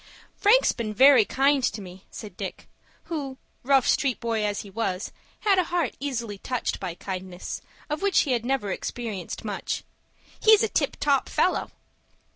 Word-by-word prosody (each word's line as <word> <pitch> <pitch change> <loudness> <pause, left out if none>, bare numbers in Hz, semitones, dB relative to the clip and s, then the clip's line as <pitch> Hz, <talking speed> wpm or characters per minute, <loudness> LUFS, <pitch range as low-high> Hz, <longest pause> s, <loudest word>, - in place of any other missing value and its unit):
"Frank's 460 +5 +5
been 215 -3 -4
very 260 -2 +7
kind 275 +2 +2
to 220 - 0
me," 185 -1 -11
said 205 -5 -9
Dick, - - -6 0.4
who, 280 -5 -5 0.2
rough 270 0 +3
street 270 -4 +2
boy 225 -2 -1
as 205 -1 -1
he 205 - -11
was, 190 -2 -2 0.3
had 400 -3 +4
a 365 - +2
heart 340 -6 -1
easily 235 -7 -3
touched 250 +2 -2
by 180 -3 -4
kindness, 185 -1 -6 0.3
of 300 +1 -3
which 400 -1 +4
he 280 - -1
had 240 -2 +1
never 245 -6 -1
experienced 215 -3 -5
much. 205 -2 -3 0.6
"He's 435 0 +6
a 445 - +1
tip - - 0
top 280 -2 +2
fellow." - - +1
240 Hz, 165 wpm, -26 LUFS, 205-285 Hz, 0.6 s, very